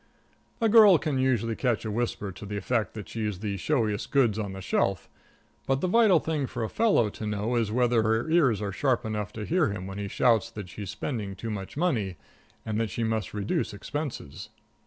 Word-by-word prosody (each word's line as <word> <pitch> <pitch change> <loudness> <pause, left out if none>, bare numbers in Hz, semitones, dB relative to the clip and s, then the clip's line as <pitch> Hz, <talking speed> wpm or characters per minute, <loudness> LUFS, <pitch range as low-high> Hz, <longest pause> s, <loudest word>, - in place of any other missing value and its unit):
A 230 - +3
girl 210 -4 +8
can 150 -4 -1
usually 120 -4 +1
catch 120 -3 0
a 110 - -2
whisper 105 -3 -2
to 90 - -11
the 105 0 -4
effect 110 +3 -1
that 105 -3 -7
she's 105 -4 -3
the 100 +1 -3
showiest 105 - -1
goods 120 -6 +2
on 100 -3 -3
the 95 - -7
shelf, 95 -1 0 0.6
but 135 0 +2
the 185 - 0
vital 205 -3 +5
thing 155 -4 -2
for 120 -2 -4
a 110 - -2
fellow 205 - +3
to 110 - -6
know 105 +3 -1
is 115 -3 +1
whether 120 0 +3
her 110 +3 +1
ears 140 - +3
are 100 - -2
sharp 130 +3 0
enough 105 -1 -3
to 110 -1 -5
hear 170 - +2
him 95 -2 -5
when 95 +1 -6
he 100 - -3
shouts 115 +1 +2
that 105 -4 -8
she's 100 0 -7
spending 105 -7 -4
too 110 +4 -5
much 100 +4 -6
money 115 - 0 0.5
and 110 0 -1
that 115 - -1
she 115 - -3
must 110 -1 -2
reduce 105 0 -1
expenses. 140 - -6
110 Hz, 210 wpm, -27 LUFS, 105-135 Hz, 0.6 s, girl